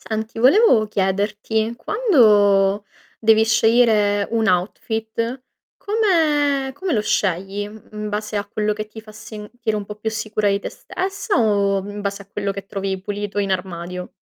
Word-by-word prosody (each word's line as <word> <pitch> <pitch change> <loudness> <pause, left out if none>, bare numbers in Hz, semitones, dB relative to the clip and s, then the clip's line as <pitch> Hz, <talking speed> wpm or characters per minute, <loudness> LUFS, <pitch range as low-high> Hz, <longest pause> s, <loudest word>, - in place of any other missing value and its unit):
Senti, 220 +1 -5
volevo 255 - +5
chiederti, 210 +3 -1
quando 210 - +3 0.4
devi 220 0 +5
scegliere 220 -2 +3
un 225 -1 +1
outfit, 220 +6 -2 0.4
come 300 -10 +1
come 360 +4 -3
lo 215 - +2
scegli? 195 0 -1 0.3
In 210 0 -5
base 210 +1 -4
a 205 0 -1
quello 210 +1 -1
che 215 0 -5
ti 215 +1 -11
fa 215 -1 -14
sentire 215 +1 -5
un 205 - -5
po' 210 - -8
più 210 +1 -3
sicura 215 -1 -1
di 200 0 +1
te - - -5
stessa, 390 +3 -3
o 200 -3 +2
in 205 0 -6
base 200 0 -3
a - - -14
quello 200 0 -3
che 195 0 -7
trovi 195 -1 -3
pulito 205 +1 -4
in 200 -1 -1
armadio? 180 -1 -4
215 Hz, 155 wpm, -21 LUFS, 200-230 Hz, 0.4 s, volevo